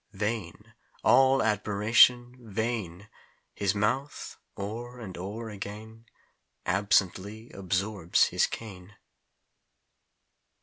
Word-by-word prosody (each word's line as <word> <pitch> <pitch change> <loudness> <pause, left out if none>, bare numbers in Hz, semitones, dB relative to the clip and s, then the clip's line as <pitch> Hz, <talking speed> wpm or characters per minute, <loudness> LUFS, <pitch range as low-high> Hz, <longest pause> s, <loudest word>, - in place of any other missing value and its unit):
Vain! 105 -4 -4 0.3
all 135 0 +5
admiration 110 +4 +4
vain! 110 -4 -4 0.5
His 100 0 0
mouth, 130 +8 -2 0.2
o'er 120 +5 -6
and 100 -6 -8
o'er 105 +5 -6
again 110 +3 -9 0.6
Absently 100 +2 0
absorbs 95 -1 +1
his - - +2
cane. 100 -3 -9
105 Hz, 80 wpm, -28 LUFS, 100-115 Hz, 0.6 s, all